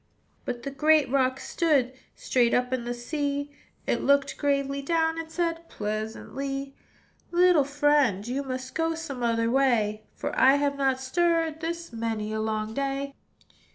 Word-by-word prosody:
But 245 Hz, -1 st, -4 dB
the 275 Hz, -, -4 dB
great 300 Hz, -1 st, +3 dB
rock 260 Hz, -1 st, +2 dB
stood 280 Hz, -7 st, +1 dB, 0.2 s
Straight 240 Hz, -2 st, +2 dB
up 250 Hz, +1 st, 0 dB
in 245 Hz, -2 st, -2 dB
the 240 Hz, -, -2 dB
sea: 285 Hz, +3 st, -3 dB, 0.3 s
It -, -, 0 dB
looked 280 Hz, 0 st, +2 dB
gravely 280 Hz, -1 st, 0 dB
down, 320 Hz, +2 st, +1 dB
And 325 Hz, -1 st, -6 dB
said 335 Hz, -1 st, -2 dB
pleasantly, 270 Hz, +6 st, -4 dB, 0.5 s
"Little 350 Hz, -3 st, +5 dB
friend, 285 Hz, -7 st, +2 dB
you 260 Hz, +3 st, -1 dB
must 260 Hz, -1 st, -5 dB
Go 325 Hz, 0 st, 0 dB
some 290 Hz, -6 st, -6 dB
other 230 Hz, -1 st, +1 dB
way; 220 Hz, -5 st, +1 dB
For -, -, -4 dB
I 265 Hz, +1 st, +6 dB
have 285 Hz, 0 st, +1 dB
not 270 Hz, -2 st, +1 dB
stirred 325 Hz, +3 st, +1 dB
This 335 Hz, -3 st, -5 dB
many 225 Hz, -2 st, -3 dB
a 220 Hz, -, -1 dB
long 215 Hz, 0 st, -2 dB
day. 275 Hz, +1 st, -2 dB
275 Hz, 155 wpm, -27 LUFS, 240-300 Hz, 0.5 s, I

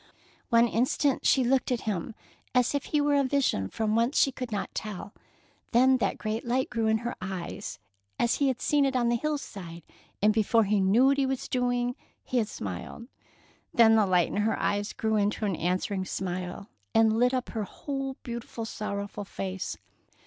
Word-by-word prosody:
One 235 Hz, -1 st, +5 dB
instant 255 Hz, +4 st, +1 dB
she 265 Hz, -, +4 dB
looked 260 Hz, +1 st, +1 dB
at 245 Hz, -, 0 dB
him 210 Hz, +1 st, -3 dB, 0.4 s
as 250 Hz, +1 st, +3 dB
if 285 Hz, -1 st, -1 dB
he 300 Hz, -, +1 dB
were 290 Hz, 0 st, +2 dB
a 280 Hz, -1 st, +4 dB
vision 260 Hz, -, +1 dB
from 220 Hz, -1 st, -1 dB
whence 235 Hz, +5 st, +2 dB
she 275 Hz, -, +4 dB
could 250 Hz, -2 st, -6 dB
not 205 Hz, -, -3 dB
tell, 205 Hz, -1 st, -6 dB, 0.6 s
then 260 Hz, +2 st, +5 dB
that 240 Hz, -, -1 dB
great 215 Hz, +1 st, -3 dB
light 250 Hz, +2 st, 0 dB
grew 225 Hz, -1 st, 0 dB
in 220 Hz, 0 st, +3 dB
her 240 Hz, -, -1 dB
eyes, 185 Hz, -2 st, -5 dB, 0.4 s
as 235 Hz, -, +2 dB
he 280 Hz, -, +2 dB
had 260 Hz, -2 st, 0 dB
seen 295 Hz, -1 st, +3 dB
it 270 Hz, -1 st, +1 dB
on 240 Hz, -2 st, +2 dB
the 240 Hz, -, +2 dB
hillside, 205 Hz, -, -4 dB, 0.4 s
and 210 Hz, +1 st, +4 dB
before 225 Hz, +1 st, +3 dB
he 205 Hz, 0 st, +2 dB
knew 200 Hz, +7 st, +4 dB
what 275 Hz, +1 st, +4 dB
he 270 Hz, -, +2 dB
was 265 Hz, -1 st, -2 dB
doing 245 Hz, -1 st, 0 dB, 0.3 s
he 255 Hz, -, 0 dB
had 220 Hz, -, 0 dB
smiled. 95 Hz, -, -6 dB, 0.7 s
Then 225 Hz, -1 st, +7 dB
the 215 Hz, -3 st, +4 dB
light 180 Hz, -2 st, +3 dB
in -, -, -4 dB
her 210 Hz, +2 st, +1 dB
eyes 205 Hz, 0 st, 0 dB
grew 220 Hz, -1 st, 0 dB
into 210 Hz, +1 st, 0 dB
an 195 Hz, -4 st, 0 dB
answering 185 Hz, +3 st, -1 dB
smile 185 Hz, +1 st, -4 dB, 0.3 s
and 225 Hz, 0 st, +4 dB
lit 250 Hz, +1 st, +4 dB
up 255 Hz, -1 st, -2 dB
her 220 Hz, -2 st, -3 dB
whole 270 Hz, +4 st, -4 dB
beautiful, 235 Hz, -1 st, -5 dB
sorrowful 200 Hz, -2 st, -5 dB
face. 190 Hz, -1 st, -4 dB
225 Hz, 190 wpm, -28 LUFS, 200-255 Hz, 0.7 s, Then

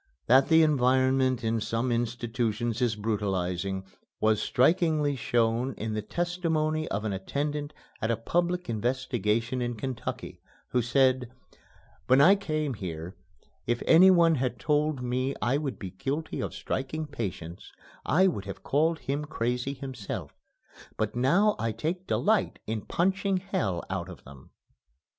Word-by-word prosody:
That 130 Hz, +3 st, +5 dB
the 160 Hz, 0 st, +6 dB
environment 130 Hz, -3 st, +2 dB
in 115 Hz, 0 st, 0 dB
some 115 Hz, +4 st, -1 dB
institutions 120 Hz, 0 st, -1 dB
is 120 Hz, -3 st, +2 dB
brutalizing, 95 Hz, -3 st, -2 dB, 0.3 s
was 110 Hz, -1 st, +2 dB
strikingly 155 Hz, 0 st, +2 dB
shown 120 Hz, +1 st, 0 dB
in 110 Hz, +1 st, -4 dB
the 105 Hz, -, -1 dB
testimony 160 Hz, -, -1 dB
of 105 Hz, +2 st, -3 dB
an 105 Hz, -, -1 dB
attendant 145 Hz, +9 st, -3 dB, 0.3 s
at 110 Hz, -, 0 dB
a 115 Hz, -, +1 dB
public 175 Hz, +9 st, -1 dB
investigation 120 Hz, 0 st, -1 dB
in 120 Hz, 0 st, -2 dB
Kentucky, 130 Hz, +2 st, -5 dB, 0.3 s
who 125 Hz, -, +1 dB
said, 130 Hz, 0 st, +2 dB, 0.8 s
"When 130 Hz, +1 st, +5 dB
I 170 Hz, +8 st, +8 dB
came 155 Hz, -7 st, -2 dB
here, 90 Hz, -4 st, -6 dB, 0.5 s
if 120 Hz, 0 st, 0 dB
anyone 170 Hz, -1 st, +6 dB
had 130 Hz, -4 st, -1 dB
told 150 Hz, -3 st, 0 dB
me 130 Hz, +2 st, -1 dB
I 130 Hz, +4 st, +1 dB
would 140 Hz, -4 st, -4 dB
be 95 Hz, -2 st, -7 dB
guilty 135 Hz, -, -3 dB
of -, -, -4 dB
striking 145 Hz, +4 st, -3 dB
patients 95 Hz, -, -6 dB, 0.3 s
I 185 Hz, +4 st, +3 dB
would 135 Hz, -, 0 dB
have 100 Hz, -, -8 dB
called 160 Hz, +4 st, +2 dB
him 145 Hz, +2 st, -2 dB
crazy 125 Hz, -2 st, -2 dB
himself, 130 Hz, -6 st, -6 dB, 0.6 s
but 110 Hz, 0 st, -1 dB
now 180 Hz, -, +3 dB
I 115 Hz, 0 st, 0 dB
take 175 Hz, +9 st, -3 dB
delight 215 Hz, -1 st, +1 dB
in 110 Hz, 0 st, -3 dB
punching 190 Hz, +2 st, +1 dB
hell 110 Hz, -, -2 dB
out 95 Hz, -1 st, -3 dB
of 90 Hz, -, -11 dB
them." 70 Hz, -1 st, -14 dB
130 Hz, 140 wpm, -28 LUFS, 110-155 Hz, 0.8 s, I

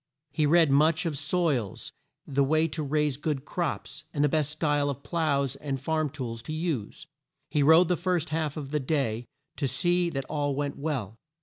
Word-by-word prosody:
He 150 Hz, +1 st, +1 dB
read 165 Hz, -1 st, +5 dB
much 155 Hz, +5 st, +4 dB
of 160 Hz, -3 st, -1 dB
soils, 140 Hz, -, -1 dB, 0.3 s
the 140 Hz, 0 st, +1 dB
way 155 Hz, +3 st, +3 dB
to 155 Hz, +2 st, -4 dB
raise 150 Hz, -1 st, 0 dB
good 150 Hz, -2 st, -2 dB
crops, 170 Hz, -1 st, -3 dB
and 145 Hz, -3 st, 0 dB
the -, -, +5 dB
best 155 Hz, 0 st, +1 dB
style 145 Hz, -2 st, +1 dB
of 140 Hz, 0 st, -5 dB
ploughs 140 Hz, -6 st, 0 dB
and 140 Hz, -2 st, -3 dB
farm 155 Hz, +2 st, 0 dB
tools 120 Hz, -5 st, -5 dB
to 155 Hz, -, -6 dB
use. 155 Hz, -, -3 dB, 0.5 s
He 150 Hz, -, +2 dB
rode 160 Hz, +5 st, +7 dB
the 180 Hz, -, +2 dB
first 175 Hz, -2 st, -1 dB
half 155 Hz, -1 st, -1 dB
of 140 Hz, -2 st, -6 dB
the 150 Hz, -, +1 dB
day 130 Hz, -5 st, -1 dB, 0.3 s
to 140 Hz, -, 0 dB
see 175 Hz, +7 st, +1 dB
that 135 Hz, -4 st, -3 dB
all 145 Hz, -1 st, -1 dB
went 145 Hz, 0 st, -2 dB
well. 125 Hz, -8 st, -3 dB
150 Hz, 190 wpm, -28 LUFS, 140-160 Hz, 0.5 s, rode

